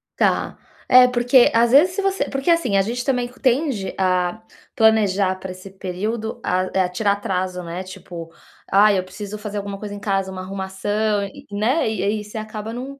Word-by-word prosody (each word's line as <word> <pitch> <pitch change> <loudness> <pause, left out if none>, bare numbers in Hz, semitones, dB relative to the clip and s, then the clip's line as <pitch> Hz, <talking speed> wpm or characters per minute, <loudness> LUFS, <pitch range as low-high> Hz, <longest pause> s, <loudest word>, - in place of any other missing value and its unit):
Tá. - - +1 0.3
É, 250 0 +9
porque 245 +1 +4
às 230 +1 +4
vezes 335 +7 +6
se 400 - -1
você 390 0 0
porque 275 +4 -2
assim, 255 -13 +3
a - - +5
gente 240 +4 -3
também 250 -3 0
tende 255 -6 0
a 185 +2 0 0.3
planejar 205 -4 +3
pra 185 0 -7
esse 185 +1 -10
período, 200 +4 -4
a 185 0 0
é, 185 -1 +2
tirar 200 +3 0
atraso, 185 -2 -3
né, 175 +2 -5
tipo: 175 -3 -9 0.4
"Ai, 205 0 +5
eu 185 - 0
preciso 200 +3 -7
fazer 210 -1 -6
alguma 200 0 -4
coisa 205 0 -7
em 205 - -7
casa, 195 -2 -1
uma 185 0 -6
arrumação", 200 +2 -2
e 195 - -11
né, 220 +6 +1
e 215 - -3
aí 210 +1 -1
você 210 +2 -9
acaba 215 0 -6
não 270 +3 -7
205 Hz, 190 wpm, -21 LUFS, 190-235 Hz, 0.4 s, É